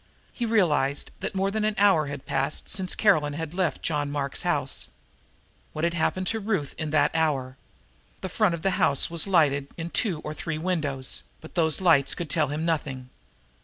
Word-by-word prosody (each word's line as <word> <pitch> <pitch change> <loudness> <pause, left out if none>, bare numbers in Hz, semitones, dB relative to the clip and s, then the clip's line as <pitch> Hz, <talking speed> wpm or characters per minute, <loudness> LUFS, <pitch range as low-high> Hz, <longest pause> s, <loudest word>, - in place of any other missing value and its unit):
He 240 - -2
realized 150 -10 +1
that - - -4
more 195 +1 +1
than 215 +1 -1
an 215 0 +1
hour 190 -7 +4
had 140 -1 -6
passed 135 +1 -1
since 185 -3 -1
Caroline 155 -9 +3
had 160 +1 -5
left 180 -2 -1
John 145 -3 -1
Mark's 140 -1 -3
house. 145 -6 -1 0.9
What 155 - -4
had 170 0 +2
happened 185 +3 0
to 225 - -2
Ruth 195 -9 -2
in 155 -1 -2
that 150 -1 +3
hour? 140 -5 0 0.7
The - - -3
front 185 -1 +1
of 160 - -10
the 195 - +2
house 140 -1 +3
was 170 +3 +2
lighted 145 -7 +3
in 165 0 -5
two 190 -10 0
or 150 - -5
three 160 0 -4
windows, 155 -6 -1 0.2
but 160 - -13
those 160 -1 +1
lights 165 -7 +4
could 170 -5 -5
tell 155 -3 +2
him 150 +3 -3
nothing. 135 -6 -2
160 Hz, 190 wpm, -26 LUFS, 145-185 Hz, 0.9 s, hour